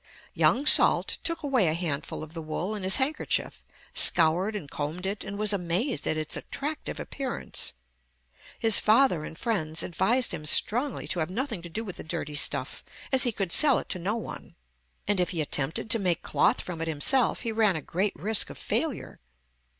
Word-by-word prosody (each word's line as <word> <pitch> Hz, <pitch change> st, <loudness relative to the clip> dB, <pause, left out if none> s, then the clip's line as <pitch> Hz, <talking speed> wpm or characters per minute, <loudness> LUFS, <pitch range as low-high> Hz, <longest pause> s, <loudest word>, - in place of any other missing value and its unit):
Young 275 Hz, +4 st, +2 dB
Salt -, -, +4 dB
took 335 Hz, -1 st, -1 dB
away 260 Hz, -, +2 dB
a 155 Hz, -, +1 dB
handful 155 Hz, -4 st, -3 dB
of 155 Hz, +1 st, -11 dB
the 165 Hz, -, -6 dB
wool 160 Hz, +6 st, -4 dB
in 210 Hz, -, -5 dB
his 190 Hz, 0 st, +5 dB
handkerchief, 285 Hz, +4 st, -1 dB, 0.3 s
scoured 175 Hz, +6 st, +4 dB
and 185 Hz, -9 st, -5 dB
combed 150 Hz, +6 st, -5 dB
it, 200 Hz, +2 st, -3 dB
and 200 Hz, -, -6 dB
was 210 Hz, 0 st, +1 dB
amazed 190 Hz, -, -1 dB
at 155 Hz, -, 0 dB
its 155 Hz, -1 st, -3 dB
attractive 295 Hz, +2 st, -5 dB
appearance. 270 Hz, -3 st, -5 dB, 0.8 s
His 225 Hz, -2 st, +5 dB
father 215 Hz, -, +3 dB
and 160 Hz, -, -8 dB
friends 165 Hz, -9 st, -2 dB
advised 215 Hz, +7 st, +1 dB
him 155 Hz, -3 st, -4 dB
strongly 245 Hz, -, +1 dB
to 180 Hz, -, -2 dB
have 160 Hz, +1 st, -1 dB
nothing 230 Hz, -1 st, -3 dB
to 170 Hz, -, -7 dB
do 220 Hz, +7 st, -4 dB
with 190 Hz, -5 st, -7 dB
the -, -, -7 dB
dirty 155 Hz, -2 st, -5 dB
stuff, 145 Hz, -, -2 dB, 0.3 s
as 265 Hz, -1 st, +4 dB
he 240 Hz, -, +2 dB
could 195 Hz, -5 st, -3 dB
sell 285 Hz, -, +6 dB
it -, -, -5 dB
to 180 Hz, -, 0 dB
no 195 Hz, +6 st, -1 dB
one; 230 Hz, -, -8 dB, 0.5 s
and 205 Hz, -2 st, +2 dB
if 180 Hz, -, +1 dB
he 175 Hz, -, -3 dB
attempted 150 Hz, +4 st, 0 dB
to 230 Hz, -, +5 dB
make 180 Hz, -4 st, 0 dB
cloth -, -, +2 dB
from 170 Hz, -3 st, -6 dB
it 165 Hz, -, -2 dB
himself, 195 Hz, -, +2 dB
he 230 Hz, -, -2 dB
ran 215 Hz, -4 st, +3 dB
a 155 Hz, -, -3 dB
great 190 Hz, +4 st, -1 dB
risk 215 Hz, 0 st, +1 dB
of -, -, -9 dB
failure. -, -, -2 dB
190 Hz, 195 wpm, -27 LUFS, 165-230 Hz, 0.8 s, sell